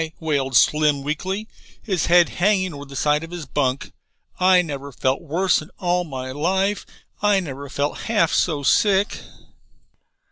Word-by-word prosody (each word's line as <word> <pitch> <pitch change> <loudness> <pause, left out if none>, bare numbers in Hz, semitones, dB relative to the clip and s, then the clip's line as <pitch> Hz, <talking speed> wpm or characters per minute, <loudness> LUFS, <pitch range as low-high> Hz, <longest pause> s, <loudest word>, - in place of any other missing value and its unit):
wailed 140 -5 -1
Slim 150 0 +3
weakly, 190 +8 -3 0.3
his 190 -8 -2
head 175 0 +5
hanging 185 -1 +1
over 145 0 -8
the 140 0 -12
side 150 +2 +1
of 165 - -8
his 175 -3 -7
bunk. 135 -1 -2 0.5
"I 185 0 +5
never 140 -3 -6
felt 130 +1 -1
worse 175 +4 +1
in 155 - -12
all 180 0 0
my 130 -4 -6
life. 190 +8 -1 0.3
I 205 -1 +3
never 140 -5 -7
felt 145 +2 -2
half 205 -8 +2
so 150 -5 +1
sick." 200 - +2
160 Hz, 150 wpm, -22 LUFS, 140-185 Hz, 0.5 s, head